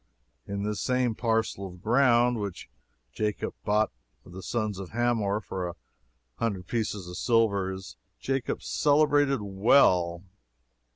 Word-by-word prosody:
In 100 0 -3
this 105 -3 -2
same 125 0 +1
"parcel 110 -4 -1
of 90 0 -13
ground" 120 0 +4
which 100 -3 -5 0.5
Jacob 105 -1 -2
bought 105 +1 +2 0.3
of - - -14
the 95 +2 -8
sons 110 -2 -2
of 95 -3 -7
Hamor 115 -3 0
for 95 -2 -4
a 85 - -7 0.6
hundred 100 -6 -2
pieces 105 -5 -3
of 90 - -7
silver, 105 -5 +2
is 95 -1 -8 0.2
Jacob's 135 -1 -2
celebrated 145 -4 +3
well. 95 -4 +3
105 Hz, 130 wpm, -27 LUFS, 95-120 Hz, 0.6 s, ground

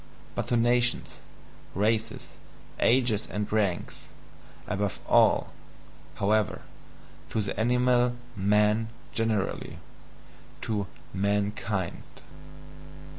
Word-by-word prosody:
but - - -3
to 120 - +2
nations, 120 +1 +2 0.5
races, 110 +3 0 0.5
ages, 120 -4 +3
and 105 0 -3
ranks; 100 -5 -1 0.6
above 100 0 -2
all, - - +4 0.6
however, 105 +1 +1 0.7
to - - -1
the 100 0 -2
animal 125 +1 +3 0.2
"man" 105 +3 +3 0.2
generally, 110 -3 -1 0.8
to 105 -3 -2 0.3
MANKIND. 100 -1 -1
110 Hz, 75 wpm, -28 LUFS, 100-115 Hz, 0.8 s, all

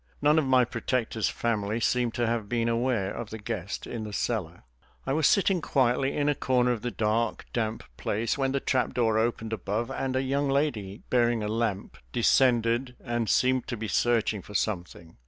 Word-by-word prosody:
None 150 +2 +4
of 155 - 0
my 130 -1 +5
protector's 115 -3 -1
family 110 -1 -1
seemed 120 0 +1
to 120 - +1
have 115 -3 -1
been 115 -1 0
aware 115 -4 0
of 115 -2 -6
the 110 - -6
guest 105 -3 -5
in 115 -2 -5
the 105 - -6
cellar. 95 -6 -3 0.4
I 135 - 0
was 155 -2 +3
sitting 195 -3 +3
quietly 135 -1 +1
in 145 0 +1
a 145 - +4
corner 125 -3 +1
of 115 -3 -2
the 120 - -2
dark, 115 0 -1
damp 110 -1 -2
place 110 +2 -1
when 135 -1 0
the 140 - 0
trap 130 -1 0
door 110 -3 +2
opened 115 -1 -1
above 110 +3 -2
and 135 -1 -2
a 130 - +1
young 140 +1 0
lady, 120 -9 -1
bearing 120 -2 +2
a - - -1
lamp, 110 -3 -2
descended 120 0 +2
and 120 -3 -1
seemed 130 0 +2
to 120 - -3
be 110 +1 -4
searching 110 -3 +1
for 105 - -12
something. 85 -2 -3
120 Hz, 190 wpm, -27 LUFS, 110-130 Hz, 0.4 s, my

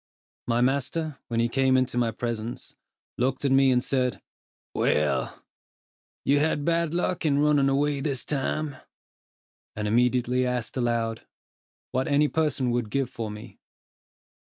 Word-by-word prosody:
My 120 0 +2
master, 140 +3 -1
when 115 -1 -1
he 115 - +3
came 130 +1 +2
into 130 -1 0
my 120 -1 +2
presence, 115 0 -5 0.4
looked 130 +3 0
at 135 - +2
me, 135 0 +5
and 125 -1 +3
said, 130 -2 0 0.5
"Well,, 75 -3 0 0.8
you 145 +1 +4
had 150 -1 0
bad 170 -1 +1
luck 175 0 -1
in 145 -3 +2
running 145 -2 +3
away 140 +1 +1
this 135 -3 -2
time;" 145 0 -2 1.0
and 105 0 -2
immediately 125 +2 +2
asked 125 -2 -2
aloud, 115 -2 -1 0.6
what 130 +1 0
any 145 +1 +3
person 145 -6 0
would 120 -2 -1
give 135 +2 -1
for 115 -2 -4
me. 105 +1 -10
130 Hz, 140 wpm, -26 LUFS, 120-145 Hz, 1.0 s, me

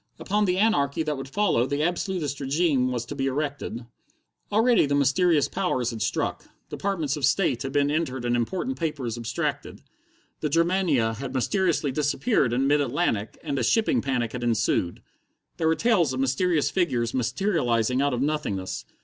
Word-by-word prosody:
Upon 210 +1 0
the 180 -1 +1
anarchy 165 -8 +2
that 155 -1 -2
would 135 0 -7
follow 160 - +1
the 145 +2 -1
absolutist 175 -4 -2
regime 135 -2 +1
was 120 -2 -3
to - - -6
be 135 -1 -1
erected. 140 -3 -3 0.7
Already 225 - +4
the 140 - +1
mysterious 145 +3 +3
powers 155 -11 -1
had 115 -2 -7
struck. - - -2 0.2
Departments 170 -8 -2
of 145 - -7
State 135 -3 +2
had 135 - -4
been 145 0 +2
entered 130 -6 -2
and 120 0 +1
important 190 - -2
papers 145 -8 -2
abstracted. 120 -1 -4 0.6
The 150 - -1
Germania 165 -8 +2
had 130 +2 -6
mysteriously 165 +1 +1
disappeared 145 - +1
in 130 +3 +1
mid 145 +1 +3
Atlantic, 120 -6 -1
and 140 -3 -2
a - - 0
shipping 230 +2 +2
panic 125 -4 -1
had 125 -1 -5
ensued. 110 -6 0 0.5
There 160 - 0
were 160 - +3
tales 175 - +2
of 130 - -3
mysterious 145 +4 +1
figures 125 -11 0
materializing 125 - 0
out 140 0 +2
of 125 - -1
nothingness. 140 -11 -2
145 Hz, 165 wpm, -25 LUFS, 125-175 Hz, 0.7 s, Already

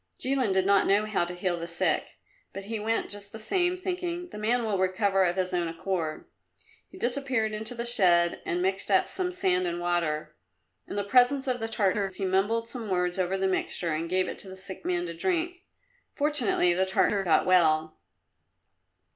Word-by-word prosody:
Jilin 260 -5 +1
did 190 0 +2
not 200 0 +4
know 205 +2 +3
how 210 -5 0
to 175 +1 -6
heal 175 -1 -1
the 170 - -5
sick, 170 0 -1 0.4
but 195 - -6
he 220 +2 -4
went 225 +2 -1
just 205 0 -6
the - - -8
same 355 - 0
thinking, 355 -1 -4
"The 210 - -8
man 235 +3 +1
will 205 -3 -1
recover 190 +1 +2
of 175 -1 +1
his 185 -1 -1
own 175 -1 0
accord." 165 -1 -3 0.6
He - - -13
disappeared 250 -3 -1
into 215 +3 -3
the 235 0 -4
shed 175 -7 +3
and 175 +1 -1
mixed 190 +2 -1
up 190 -2 +3
some 370 -1 -3
sand 185 - +1
and 175 0 -3
water. 155 -3 -1 0.5
In - - -6
the 205 - -1
presence 250 +6 +3
of 250 -1 0
the 225 - -2
Tartars 200 -3 0
he 195 - -3
mumbled 205 +5 +1
some 230 -3 -6
words 180 0 0
over 185 +1 0
the 190 0 +1
mixture, 175 -3 -1
and 165 +2 -3
gave 185 +1 +1
it - - -6
to 195 - -4
the 190 - -9
sick 190 0 -8
man 175 -1 -1
to 170 - -5
drink. 350 - -2 0.5
Fortunately 285 -11 +3
the 190 +2 +1
Tartar 195 +1 +2
got 170 -4 +3
well. 160 -3 +3
195 Hz, 195 wpm, -27 LUFS, 180-230 Hz, 0.6 s, not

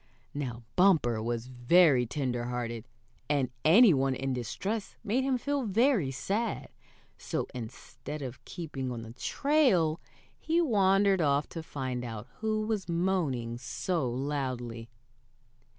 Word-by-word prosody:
Now 125 -5 -4
Bumper 160 - +4
was 115 +1 -2
very 130 +1 +4
tender 125 -2 -2
hearted, 120 -2 -4 0.4
and 140 -4 +1
any 195 +5 +7
one 135 -1 +1
in 135 +1 -2
distress 190 - -3
made 230 +5 +1
him 265 -1 +1
very 245 - +1
sad. 200 - -2 0.5
So - - -2
instead 125 +4 -7
of 130 -1 -7
keeping 145 -7 -5
on 115 -2 -5
the 115 0 -10
trail, 190 - +2 0.4
he 330 +2 +1
wandered 195 - +3
off 145 -1 +2
to 165 - -6
find 130 -5 -4
out 115 -2 -6
who 215 -1 0
was 210 -4 -2
moaning 160 -10 0
so 140 +2 -2
loudly. 125 -3 -3
145 Hz, 125 wpm, -30 LUFS, 125-195 Hz, 0.5 s, any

